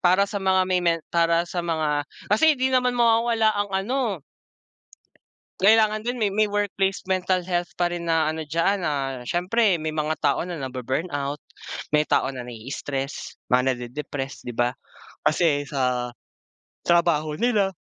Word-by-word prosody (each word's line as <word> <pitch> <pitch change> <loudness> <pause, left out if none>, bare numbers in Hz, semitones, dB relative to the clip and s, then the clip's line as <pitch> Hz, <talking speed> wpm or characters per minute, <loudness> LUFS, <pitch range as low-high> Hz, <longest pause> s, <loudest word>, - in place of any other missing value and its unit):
Para 185 +2 +4
sa 200 0 -4
mga 190 -1 +3
may 185 -1 +1
men 170 -1 +1
para 170 0 +3
sa 175 0 -3
mga 155 -3 -1 0.2
kasi 310 +7 +5
di 260 +1 0
naman 250 -1 +2
mawawala 230 -1 +3
ang 205 -1 -1
ano. 210 - -1 1.4
Kailangan 215 +2 +4
din 245 0 -2
may 205 -2 +2
may 215 +2 +2
workplace 200 -2 -1
mental 185 0 +1
health 175 -1 -2
pa 175 -1 0
rin 175 -1 -4
na 160 -2 +2
ano 160 0 -5
diyan. 165 +6 +1
Ah, 140 -3 -1 0.2
siyempre 185 - +2
may 160 - -1
mga 155 0 -1
tao 145 +2 +2
na 180 - -5
nabu-burnout, 140 +3 -3 0.5
may 150 0 +3
tao 130 - +2
na 125 -2 -7
nai-stress, 135 +4 -5 0.2
mga 125 +1 +3
nade-depressed, 135 +3 -6
di 120 - -5
ba? 120 +1 +2 0.5
Kasi 155 -3 +2
sa 125 -3 -1 0.7
trabaho 160 -3 +2
nila. 210 -5 +2
170 Hz, 150 wpm, -24 LUFS, 145-200 Hz, 1.4 s, kasi